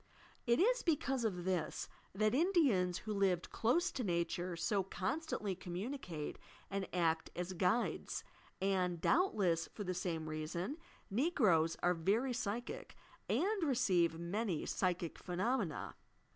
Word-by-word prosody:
It 235 Hz, +1 st, +4 dB
is -, -, +4 dB
because 280 Hz, -6 st, +1 dB
of 180 Hz, -5 st, -1 dB
this 180 Hz, -4 st, -1 dB, 0.2 s
that 215 Hz, +3 st, +2 dB
Indians, 265 Hz, -, +3 dB
who 215 Hz, -, -1 dB
lived 190 Hz, -3 st, +1 dB
close 335 Hz, +11 st, +2 dB
to 255 Hz, -, -3 dB
nature, 175 Hz, -1 st, -1 dB
so 185 Hz, +4 st, +1 dB
constantly 200 Hz, -, -2 dB
communicate 180 Hz, -, -5 dB, 0.3 s
and 195 Hz, -1 st, -2 dB
act 165 Hz, -2 st, +1 dB
as 180 Hz, +1 st, -3 dB
"guides," 185 Hz, +7 st, 0 dB, 0.4 s
and 185 Hz, -3 st, +1 dB
doubtless 185 Hz, -, +2 dB
for 210 Hz, -, -4 dB
the 185 Hz, -1 st, -2 dB
same 170 Hz, -3 st, -2 dB
reason 170 Hz, -, -3 dB, 0.3 s
Negroes 200 Hz, -, +3 dB
are 180 Hz, -, +4 dB
very 210 Hz, +10 st, +1 dB
psychic, 240 Hz, -, -4 dB, 0.3 s
and 405 Hz, +2 st, +1 dB
receive 190 Hz, -, +3 dB
many 175 Hz, +1 st, -1 dB
psychic 175 Hz, -3 st, -1 dB
phenomena. 185 Hz, -, -1 dB
190 Hz, 125 wpm, -36 LUFS, 175-245 Hz, 0.4 s, It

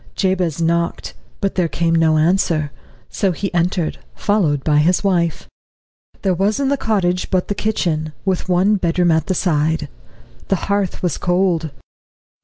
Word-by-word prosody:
Jabez 185 Hz, -5 st, 0 dB
knocked, 170 Hz, 0 st, -1 dB, 0.3 s
but 195 Hz, -, 0 dB
there 180 Hz, -2 st, +1 dB
came 165 Hz, +1 st, 0 dB
no 160 Hz, -1 st, +3 dB
answer; 160 Hz, -2 st, +1 dB, 0.4 s
so 195 Hz, -3 st, 0 dB
he 195 Hz, +3 st, -4 dB
entered, 175 Hz, -1 st, 0 dB, 0.2 s
followed 165 Hz, -10 st, +1 dB
by 150 Hz, -1 st, +2 dB
his 175 Hz, +6 st, +2 dB
wife. 175 Hz, -4 st, 0 dB, 0.8 s
There 190 Hz, -2 st, +2 dB
was 200 Hz, +7 st, 0 dB
in 275 Hz, -1 st, +1 dB
the 280 Hz, -, +2 dB
cottage 190 Hz, -8 st, 0 dB
but 185 Hz, -2 st, 0 dB
the -, -, +1 dB
kitchen, 170 Hz, -8 st, -1 dB
with 190 Hz, -1 st, -1 dB
one 190 Hz, +4 st, +3 dB
bedroom 175 Hz, -1 st, +1 dB
at 160 Hz, -1 st, +1 dB
the 185 Hz, -, 0 dB
side. 160 Hz, -3 st, 0 dB, 0.6 s
The 195 Hz, -, +2 dB
hearth 200 Hz, 0 st, -2 dB
was 175 Hz, -4 st, -1 dB
cold. 175 Hz, -3 st, +1 dB
175 Hz, 155 wpm, -19 LUFS, 165-195 Hz, 0.8 s, no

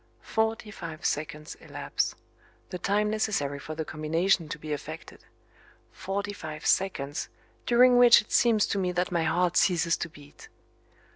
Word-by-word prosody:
Forty 220 Hz, -1 st, -1 dB
five 165 Hz, -6 st, -8 dB
seconds 150 Hz, 0 st, -3 dB
elapse -, -, -3 dB, 0.6 s
the 180 Hz, -, -5 dB
time 210 Hz, +3 st, +1 dB
necessary 175 Hz, -10 st, -1 dB
for 155 Hz, +2 st, -7 dB
the 160 Hz, 0 st, -4 dB
combination 165 Hz, +3 st, 0 dB
to -, -, -4 dB
be 155 Hz, -1 st, -5 dB
effected 145 Hz, -, -8 dB, 0.7 s
forty 200 Hz, +1 st, -4 dB
five 155 Hz, -5 st, -8 dB
seconds 145 Hz, -7 st, 0 dB, 0.4 s
during 245 Hz, +1 st, +6 dB
which 245 Hz, -1 st, +8 dB
it 215 Hz, -, -8 dB
seems 225 Hz, -4 st, +4 dB
to 200 Hz, -, -2 dB
me 180 Hz, -1 st, 0 dB
that 180 Hz, +1 st, -1 dB
my 170 Hz, -2 st, +1 dB
heart 175 Hz, +2 st, +1 dB
ceases 170 Hz, -2 st, +3 dB
to 170 Hz, -, -4 dB
beat. 145 Hz, -2 st, -16 dB
175 Hz, 150 wpm, -27 LUFS, 155-205 Hz, 0.7 s, which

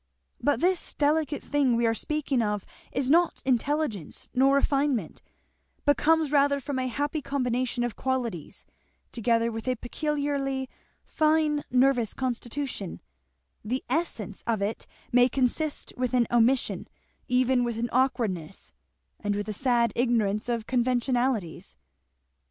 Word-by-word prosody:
But 290 Hz, 0 st, +1 dB
this 365 Hz, 0 st, +1 dB
delicate 295 Hz, -1 st, +1 dB
thing 280 Hz, -4 st, +2 dB
we 235 Hz, 0 st, +2 dB
are 225 Hz, -, +3 dB
speaking 285 Hz, 0 st, -1 dB
of 210 Hz, -3 st, -1 dB, 0.3 s
is 270 Hz, 0 st, 0 dB
not 345 Hz, +2 st, +3 dB
intelligence 260 Hz, -, -1 dB
nor 270 Hz, +2 st, +4 dB
refinement, 275 Hz, -, 0 dB, 0.6 s
but 290 Hz, -, +5 dB
comes 320 Hz, -2 st, +2 dB
rather 285 Hz, -1 st, +3 dB
from 275 Hz, 0 st, -3 dB
a 255 Hz, -, -1 dB
happy 290 Hz, +5 st, -2 dB
combination 250 Hz, -3 st, -1 dB
of 240 Hz, -2 st, -2 dB
qualities, 245 Hz, -, -3 dB, 0.5 s
together 230 Hz, 0 st, +1 dB
with 225 Hz, +2 st, -6 dB
a 255 Hz, -, +2 dB
peculiarly 275 Hz, 0 st, -2 dB, 0.4 s
fine 310 Hz, -1 st, +2 dB
nervous 250 Hz, -3 st, +2 dB
constitution; 250 Hz, -4 st, -3 dB, 0.6 s
the 250 Hz, +5 st, -2 dB
essence 225 Hz, -, -2 dB
of 225 Hz, -3 st, +1 dB
it 200 Hz, +3 st, -3 dB, 0.2 s
may 245 Hz, +1 st, +5 dB
consist 275 Hz, +4 st, 0 dB
with 255 Hz, 0 st, -1 dB
an 245 Hz, -1 st, +4 dB
omission, 240 Hz, +2 st, +2 dB, 0.4 s
even 250 Hz, 0 st, +3 dB
with 235 Hz, -2 st, -2 dB
an 235 Hz, 0 st, -2 dB
awkwardness, 225 Hz, -10 st, -1 dB, 0.5 s
and 205 Hz, -1 st, -1 dB
with 205 Hz, +1 st, -3 dB
a 215 Hz, -, -3 dB
sad 235 Hz, -1 st, +2 dB
ignorance 230 Hz, -3 st, +1 dB
of 230 Hz, -2 st, -1 dB
conventionalities." 245 Hz, -5 st, 0 dB
255 Hz, 130 wpm, -27 LUFS, 230-280 Hz, 0.6 s, but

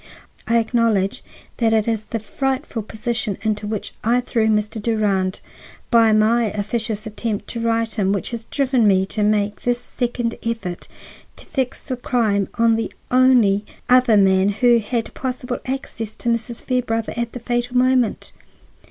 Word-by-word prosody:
I 230 Hz, -, +3 dB
acknowledge 225 Hz, -4 st, +1 dB, 0.3 s
that 225 Hz, -2 st, +2 dB
it 220 Hz, -1 st, +2 dB
is 220 Hz, -2 st, -1 dB
the 230 Hz, -, -3 dB
frightful 265 Hz, +3 st, -3 dB
position 220 Hz, -1 st, -2 dB
into 215 Hz, -1 st, -1 dB
which 215 Hz, -1 st, -4 dB
I 235 Hz, +3 st, +3 dB
threw 230 Hz, -2 st, 0 dB
Mr. 215 Hz, 0 st, 0 dB
Durand 205 Hz, -4 st, 0 dB, 0.5 s
by 230 Hz, -2 st, +5 dB
my 220 Hz, +2 st, +3 dB
officious 215 Hz, +1 st, -2 dB
attempt 215 Hz, 0 st, -4 dB
to 235 Hz, -, -4 dB
right 230 Hz, -1 st, 0 dB
him 195 Hz, -3 st, +1 dB
which 200 Hz, +3 st, -1 dB
has 230 Hz, -1 st, -5 dB
driven 260 Hz, -5 st, +1 dB
me 190 Hz, -1 st, +4 dB
to 210 Hz, +2 st, -3 dB
make 210 Hz, 0 st, +1 dB
this 245 Hz, 0 st, 0 dB
second 240 Hz, -1 st, -3 dB
effort 225 Hz, -7 st, -4 dB, 0.5 s
to -, -, -11 dB
fix 260 Hz, -2 st, -3 dB
the 255 Hz, -3 st, -3 dB
crime 220 Hz, -6 st, +1 dB
on 230 Hz, -1 st, +3 dB
the 225 Hz, -, -3 dB, 0.2 s
only 245 Hz, -6 st, +4 dB, 0.3 s
other 250 Hz, -3 st, +6 dB
man 190 Hz, 0 st, +4 dB
who 235 Hz, +3 st, +4 dB
had 225 Hz, +1 st, -3 dB
possible 250 Hz, -1 st, -4 dB
access 235 Hz, -5 st, -5 dB
to 240 Hz, -, -3 dB
Mrs. 235 Hz, 0 st, -2 dB
Fairbrother 230 Hz, -3 st, -1 dB
at 235 Hz, -1 st, -3 dB
the 245 Hz, -, -5 dB
fatal 245 Hz, +1 st, -1 dB
moment. 255 Hz, -2 st, +2 dB
225 Hz, 160 wpm, -21 LUFS, 210-245 Hz, 0.5 s, other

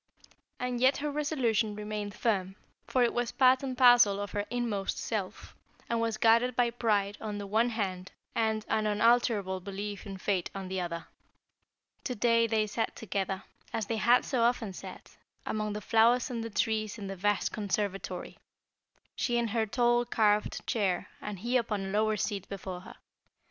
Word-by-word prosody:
And 250 Hz, -1 st, -2 dB
yet 260 Hz, +2 st, +5 dB
her 295 Hz, 0 st, -2 dB
resolution 245 Hz, -8 st, 0 dB
remained 210 Hz, -1 st, -5 dB
firm, 195 Hz, -4 st, 0 dB, 0.3 s
for 255 Hz, -, +2 dB
it 235 Hz, -, +2 dB
was 240 Hz, -1 st, -1 dB
part 260 Hz, -1 st, +4 dB
and 260 Hz, -2 st, -4 dB
parcel 245 Hz, -6 st, +6 dB
of 205 Hz, 0 st, -4 dB
her 205 Hz, 0 st, -2 dB
inmost 230 Hz, -5 st, -2 dB
self, 205 Hz, -5 st, -4 dB, 0.3 s
and 230 Hz, -1 st, 0 dB
was 225 Hz, -1 st, -1 dB
guarded 230 Hz, +2 st, +4 dB
by 240 Hz, -1 st, +2 dB
pride 210 Hz, -4 st, 0 dB
on 210 Hz, -2 st, -4 dB
the 205 Hz, -, -5 dB
one 220 Hz, +4 st, +2 dB
hand 190 Hz, -5 st, -3 dB, 0.2 s
and 220 Hz, -1 st, 0 dB
an 215 Hz, -1 st, +1 dB
unalterable 210 Hz, -3 st, +2 dB
belief 200 Hz, +2 st, -6 dB
in 195 Hz, -1 st, -6 dB
fate 185 Hz, -2 st, -1 dB
on 190 Hz, -1 st, -5 dB
the 190 Hz, -1 st, -2 dB
other. 170 Hz, -1 st, -4 dB, 1.0 s
To 250 Hz, -, -2 dB
day 230 Hz, +1 st, +3 dB
they 220 Hz, -1 st, +1 dB
sat 225 Hz, +2 st, -2 dB
together, 195 Hz, -2 st, -3 dB, 0.3 s
as 220 Hz, -, -1 dB
they 225 Hz, +2 st, -2 dB
had 240 Hz, +3 st, +4 dB
so 255 Hz, -4 st, 0 dB
often 230 Hz, -4 st, +1 dB
sat, -, -, -10 dB, 0.3 s
among 215 Hz, -1 st, -2 dB
the 210 Hz, -, -4 dB
flowers 230 Hz, +4 st, +3 dB
and 230 Hz, -2 st, -3 dB
the 230 Hz, -, -4 dB
trees 215 Hz, 0 st, -1 dB
in 205 Hz, -, -6 dB
the 195 Hz, 0 st, -5 dB
vast 205 Hz, +2 st, 0 dB
conservatory, 200 Hz, -1 st, -3 dB, 0.8 s
she 240 Hz, -1 st, 0 dB
in 235 Hz, -1 st, 0 dB
her 220 Hz, 0 st, 0 dB
tall, 240 Hz, +1 st, +2 dB
carved 210 Hz, -3 st, +1 dB
chair 195 Hz, -6 st, 0 dB
and 210 Hz, -2 st, -5 dB
he 240 Hz, +3 st, +2 dB
upon 215 Hz, -5 st, -1 dB
a -, -, -4 dB
lower 215 Hz, +2 st, +1 dB
seat 200 Hz, -1 st, -3 dB
before 190 Hz, -2 st, -6 dB
her. -, -, -12 dB
215 Hz, 175 wpm, -30 LUFS, 200-235 Hz, 1.0 s, parcel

